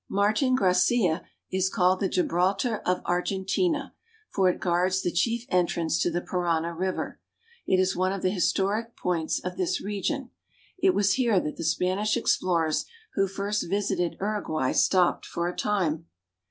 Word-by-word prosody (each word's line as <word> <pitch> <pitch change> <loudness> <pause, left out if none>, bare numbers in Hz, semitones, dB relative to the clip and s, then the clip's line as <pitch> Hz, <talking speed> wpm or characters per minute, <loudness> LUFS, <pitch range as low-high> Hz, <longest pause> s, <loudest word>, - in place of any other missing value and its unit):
Martin 215 +6 +2
Gracia 180 -3 +2 0.3
is 190 0 +1
called 185 0 +2
the 195 - 0
Gibraltar 190 +6 0
o - - +4
of 180 - -1
Argentina, 190 - 0 0.4
for 190 -2 +3
it 180 - -2
guards 185 +2 +1
the 175 - 0
chief 230 +7 0
entrance 170 -2 +1
to - - +2
the 175 +1 -2
Parana 170 -2 -1
river. 185 +2 -3 0.5
It 185 - +3
is 185 0 +2
one 185 +1 +1
of 195 -1 -4
the 185 - +2
historic 205 +4 0
points 170 -3 -1
of 180 0 -5
this 180 0 0
region. 205 +6 -3 0.5
It 380 0 +3
was 200 -1 +3
here 235 -7 +3
that 150 - -4
the - - -6
Spanish 185 +6 +1
explorers 165 -4 +1 0.3
who 195 0 +2
first 200 0 -2
visited 190 -3 -1
Uruguay 190 -10 -1
stopped 180 -2 +2
for 170 0 -2
a 180 - -4
time. 170 -6 -1
185 Hz, 160 wpm, -26 LUFS, 175-205 Hz, 0.5 s, o